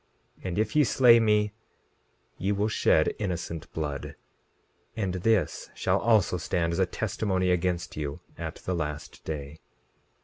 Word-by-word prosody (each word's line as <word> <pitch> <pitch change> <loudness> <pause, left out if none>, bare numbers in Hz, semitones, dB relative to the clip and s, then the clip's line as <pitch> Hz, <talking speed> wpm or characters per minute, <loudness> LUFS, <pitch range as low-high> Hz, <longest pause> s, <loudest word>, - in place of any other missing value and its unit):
And 90 -1 -3
if 110 +3 0
ye 150 - +6
slay 120 -3 +6
me 105 -2 +2 0.9
ye 95 +3 0
will 105 +2 +1
shed - - +3
innocent 85 -5 -4
blood, 75 -4 -4 0.8
and 95 -5 -1
this 95 -1 +1
shall - - +1
also 110 -6 +3
stand 85 0 -1
as - - -1
a - - +3
testimony 95 -3 0
against 90 0 -1
you 75 -1 -4 0.2
at - - -5
the 90 - -4
last 75 -3 -4
day. 75 0 -6
90 Hz, 140 wpm, -28 LUFS, 80-105 Hz, 0.9 s, ye